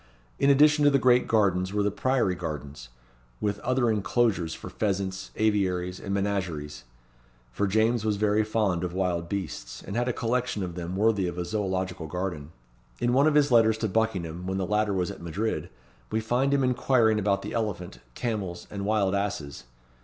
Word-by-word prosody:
In 140 - +4
addition 150 +2 +5
to 145 - +7
the 140 - +4
great 125 -1 +4
gardens 95 -4 +2
were 105 0 +1
the 105 - +1
priory 130 -5 +1
gardens, 75 -7 -6 0.5
with 100 -1 -1
other 125 -1 +1
inclosures 100 -4 +1
for - - -9
pheasants, 95 -2 -2
aviaries, 95 -4 0
and 100 - -6
menageries; 90 -9 -2 0.7
for 100 +11 0
James 110 +3 +2
was 110 -1 +1
very 105 +1 +2
fond 105 -5 0
of 90 -1 -3
wild 90 -3 -1
beasts, 75 -11 -5
and 100 - -6
had 120 +1 0
a - - +2
collection 120 -3 -1
of 90 -2 -4
them 90 +1 -5
worthy 100 -2 +2
of 85 0 -5
a 90 - -2
zoological 95 -3 -2
garden. 85 -3 -4 0.5
In 120 0 +1
one 140 +4 +5
of 155 - +2
his 145 -2 +4
letters 110 -2 +5
to 110 - -1
Buckingham 90 -5 -1
when 95 0 -1
the 95 - -1
latter 105 0 +1
was 90 -2 -1
at - - -11
Madrid, 95 +7 -3 0.4
we 110 - +1
find 125 +5 +1
him 140 -1 +2
inquiring 125 -3 +3
about 100 -1 0
the 105 - -5
elephant, 105 -6 -3 0.2
camels, 100 -7 -3
and 100 -1 -4
wild 105 -3 +2
asses. 95 -11 -3
100 Hz, 185 wpm, -27 LUFS, 90-110 Hz, 0.7 s, to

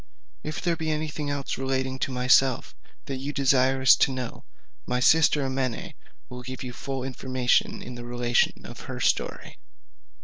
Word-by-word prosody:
If 155 +1 -5
there 170 -2 +1
be 160 -1 -3
any 155 0 -1
thing 150 -1 -4
else 140 -2 -3
relating 130 0 -1
to 135 - -1
myself 125 0 +3 0.3
that 135 - -4
you 140 +2 -4
desire 130 -1 +2
to 135 - +6
know, 130 -2 -5 0.4
my 125 0 0
sister 155 +1 +4
Amene 130 -3 -2 0.3
will 125 0 -8
give 130 +1 -7
you 125 -1 -6
full 135 0 -4
information 130 -1 0
in 125 - -7
the 120 0 -8
relation 120 0 0
of - - -9
her - - -5
story. - - -1
130 Hz, 165 wpm, -26 LUFS, 125-140 Hz, 0.4 s, to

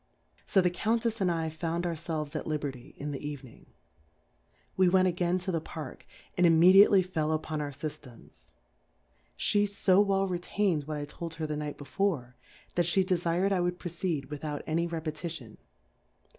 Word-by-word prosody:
So 190 - +4
the 180 -1 +2
Cou>,tejs 225 +4 0
and 185 - +3
I 165 -2 -1
found 165 +2 -2
our 170 - 0
felves 155 -2 -4
at - - -3
Liberty, 145 -5 -4
in 145 +1 -4
the 140 - -6
Evening: 145 -4 -8 1.1
We 185 -1 +4
went 185 0 +4
again 175 0 +1
to 185 +1 -3
the 165 -2 -1
Park, 155 -4 -8 0.3
and 180 -1 +5
immediately 185 +4 +7
fell 160 -4 -1
upon 155 -1 -2
our 145 - -3
Syftems; 145 -3 -9 0.9
She 205 0 +2
fo 195 -1 +3
well 195 -1 +2
retained 175 -3 0
what 155 0 -4
I 145 - -3
told 160 +2 -7
her 160 -1 -3
the 150 -1 -3
Night 150 -1 -4
before, 145 -5 -2 0.4
that 175 -1 +1
file 190 +2 +3
defirM 180 +1 +1
I 190 - +2
would 175 0 -1
proceed 170 -5 -3
without 150 0 -4
any 170 +2 0
Repetition. 155 -7 -5
165 Hz, 165 wpm, -29 LUFS, 150-185 Hz, 1.1 s, immediately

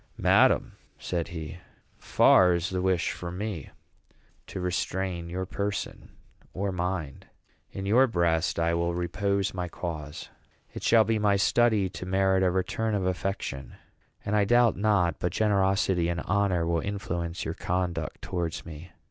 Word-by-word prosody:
"Madam," - - +4 0.3
said 85 -2 -3
he, 80 0 -7 0.4
"far 90 -1 +5
is 90 +3 -2
the 90 -1 -1
wish 95 -2 +1
from 90 0 -6
me 100 -7 -4 0.8
to - - -6
restrain 90 -1 -2
your 95 +2 -3
person 100 +2 -4 0.5
or 100 +1 -1
mind. 90 -5 -4 0.4
In 95 - -6
your 120 +7 +5
breast 85 -5 +1
I 85 0 +1
will 85 0 0
repose 100 +3 -1
my 90 -1 -3
cause. 80 -3 -6 0.4
It - - -7
shall 115 -1 +5
be 110 +1 0
my 105 -1 +3
study 110 0 +3
to 90 0 -8
merit 95 0 +2
a 95 - +3
return 95 +4 -1
of 95 -2 -1
affection; 90 -7 -3 0.5
and 105 - 0
I 105 - +4
doubt 120 +2 +4
not 95 -5 +1
but 90 - -2
generosity 95 -4 +2
and 85 -2 -2
honor 100 -4 +1
will 85 -1 0
influence 90 -3 -4
your 80 - -2
conduct 90 -2 -3
towards 85 -3 -3
me. 80 +1 -10
90 Hz, 150 wpm, -27 LUFS, 85-100 Hz, 0.8 s, far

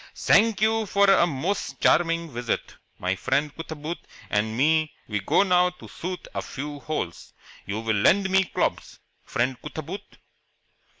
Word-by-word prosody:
"Zank 215 -1 +4
you 220 0 +2
for 200 +1 +4
a 175 - +5
most 170 +6 -2
charming 165 -1 +2
visit. 120 -1 -3 0.2
My 90 +1 -1
friend 145 +9 0
Cootaboot 160 0 -6 0.3
and 110 +2 0
me 155 +3 +2
we 105 -1 -1
go 195 - +3
now 180 -2 +4
to 180 - -13
shoot 180 +1 -6
a - - -2
few 145 +1 -6
holes. 140 - -5 0.3
You 105 +2 -3
will 110 -2 0
lend 190 - +4
me 190 0 +4
clobs, - - -2 0.3
friend 130 -2 -1
Cootaboot?" 160 +6 -7
160 Hz, 145 wpm, -25 LUFS, 130-185 Hz, 0.3 s, a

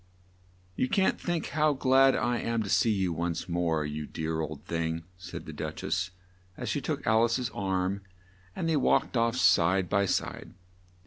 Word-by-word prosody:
"You 125 - 0
can't 190 -1 +2
think 175 -3 -2
how 155 -1 +2
glad 135 0 +4
I 120 +2 0
am 115 -1 -1
to 100 - -4
see 115 - +4
you 95 -5 +1
once 85 +1 -2
more, 85 -3 0
you 75 0 -4
dear 80 0 -3
old 75 -2 -6
thing!" 80 0 -2
said 90 0 -8
the - - -8
Duch - - -5
ess 95 0 -1 0.5
as - - -4
she - - -1
took - - -3
Al 110 +1 +4
ice's 120 +1 -1
arm, 95 0 -1 0.5
and 165 - -2
they 160 -2 +2
walked 135 - +2
off 115 0 +2
side 95 -5 +3
by 100 -1 +2
side. - - -2
95 Hz, 180 wpm, -29 LUFS, 85-120 Hz, 0.5 s, glad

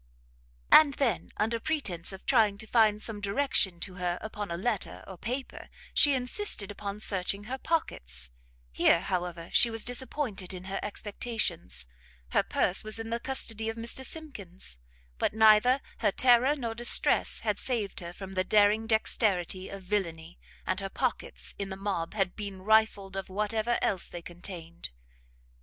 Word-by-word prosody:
And 290 -3 +8
then, 235 -9 0
under 225 +2 0
pretence 225 - -2
of 190 0 -10
trying 220 -6 +4
to 220 - -6
find 215 -2 +4
some 215 -1 -1
direction 200 -4 +1
to 185 - -4
her 175 0 0
upon 210 -2 -5
a 170 - -3
letter, 210 +1 -2
or 190 - -9
paper, 250 +8 -5 0.2
she 285 -2 +5
insisted 250 - +1
upon 200 0 -6
searching 200 -1 0
her 260 +5 -5
pockets: 65 - -2 0.4
here, 165 - +4
however, 180 -3 -3
she 240 - +6
was 225 -1 -1
disappointed 245 -6 -2
in 180 - -8
her 195 +1 -4
expectations: 200 - -2 0.4
her - - +3
purse 180 - +1
was 215 0 -4
in 225 0 -5
the 235 - 0
custody 225 -4 -2
of 225 - -5
Mr 235 +3 0
Simkins, 200 - -5 0.4
but - - 0
neither 220 +4 +6 0.2
her - - +3
terror 250 +5 +5
nor 235 -5 -3
distress 240 +2 +2
had 210 -2 -1
saved 230 -6 -1
her 170 -1 -7
from 190 +1 -9
the 185 0 +1
daring 210 +2 +4
dexterity 195 -4 0
of 195 -1 -8
villainy, 175 -4 -3 0.3
and 185 - 0
her 195 -1 -4
pockets, 255 +4 -3
in 200 -1 -3
the 190 - -4
mob, 195 -2 -3
had 195 -4 0
been 200 -3 -6
rifled 215 -2 +3
of 195 0 -4
whatever 215 +4 0
else 190 -3 0
they 175 -1 -8
contained. 170 -1 -7
205 Hz, 160 wpm, -29 LUFS, 185-230 Hz, 0.4 s, And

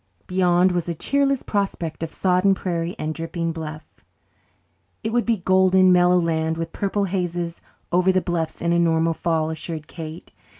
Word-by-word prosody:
Beyond 180 0 +3
was 175 -1 -2
a 170 - -2
cheerless 275 - +1
prospect 195 -6 -2
of 165 - -3
sodden 185 +2 +2
prairie 175 -2 -3
and 155 +1 -3
dripping 165 +1 -3
"bluff." 155 -1 -7 1.2
"It 220 +1 -2
would 240 0 +1
be 230 - +3
a - - -9
golden, 185 0 +4
mellow 180 0 +5
land, 160 -1 0
with 165 0 -4
purple 200 0 -1
hazes 175 -3 -2 0.3
over 180 +2 +4
the 185 - +3
bluffs, 170 -3 -3
in 170 0 +2
a 170 - +3
normal 165 -1 +2
fall," 160 -1 -1
assured 160 -1 -5
Kate. 160 -1 -9
175 Hz, 170 wpm, -23 LUFS, 165-185 Hz, 1.2 s, mellow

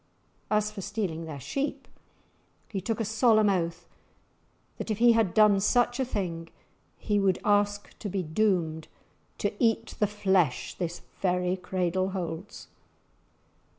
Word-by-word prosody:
As 210 0 +1
for 210 -2 -7
stealing 185 -6 -3
their 150 -3 -7
sheep, 275 - -3 0.8
he 195 -3 -3
took 225 +4 -2
a 225 - 0
solemn 220 -1 +4
oath 170 -2 -2 0.9
that - - -5
if 215 - 0
he 240 +1 +6
had 225 -6 +2
done 210 -2 +6
such 245 +4 +2
a 265 - +1
thing 170 -8 -4 0.5
he 205 -1 0
would 195 -2 +2
ask 205 0 +1
to 205 - -4
be 190 0 -2
doomed 160 -2 0 0.5
to - - -1
"eat 225 0 +1
the 210 - +3
flesh 190 -8 +1
this 175 -1 -5 0.2
very 180 -1 +1
cradle 185 0 -1
holds!" 180 0 -6
195 Hz, 140 wpm, -28 LUFS, 175-215 Hz, 0.9 s, he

